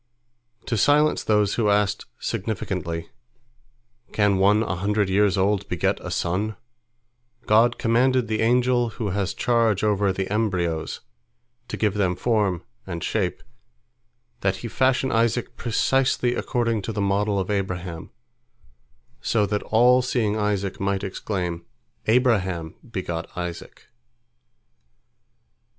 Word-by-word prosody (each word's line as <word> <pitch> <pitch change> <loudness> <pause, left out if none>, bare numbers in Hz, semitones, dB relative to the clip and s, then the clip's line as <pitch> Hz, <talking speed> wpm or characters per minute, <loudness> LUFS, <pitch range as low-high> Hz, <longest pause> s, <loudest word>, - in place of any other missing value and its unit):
To 120 -4 -1
silence 150 +6 +3
those 105 -2 +2
who 110 -3 +1
asked 105 0 +1
significantly, 95 -5 -3 1.0
"Can 100 -2 +2
one 105 +3 +4
a 95 -5 -3
hundred 100 +1 0
years 100 0 +3
old 100 +1 +1
beget - - 0
a - - -5
son?" 100 +5 -1 0.9
God 115 +3 +4
commanded 125 +1 +2
the 110 0 -1
angel 120 +1 +2
who 105 -4 -2
has 100 0 -2
charge 115 -5 +2
over 105 -2 +2
the 95 0 -3
embryos, 90 -7 -1 0.7
to - - -5
give 105 -3 +1
them 95 -3 0
form 105 -5 0 0.2
and 85 -3 -5
shape, - - -1 1.0
that - - 0
he - - -2
fashion 130 0 +1
Isaac 115 +1 0
precisely 125 +1 +1
according 115 -4 -1
to 115 - -4
the 105 - -4
model 100 +1 +1
of 95 +2 -2
Abraham, 90 -4 -3 1.1
so 105 -3 +1
that 105 0 -1
all 125 +3 +4
seeing 120 -4 0
Isaac 105 -2 -1
might 100 0 -1
exclaim, 90 -3 -3 0.4
"Abraham 100 - +1 0.2
begot 85 -5 -4
Isaac." 90 -1 -6
105 Hz, 120 wpm, -24 LUFS, 95-115 Hz, 1.1 s, one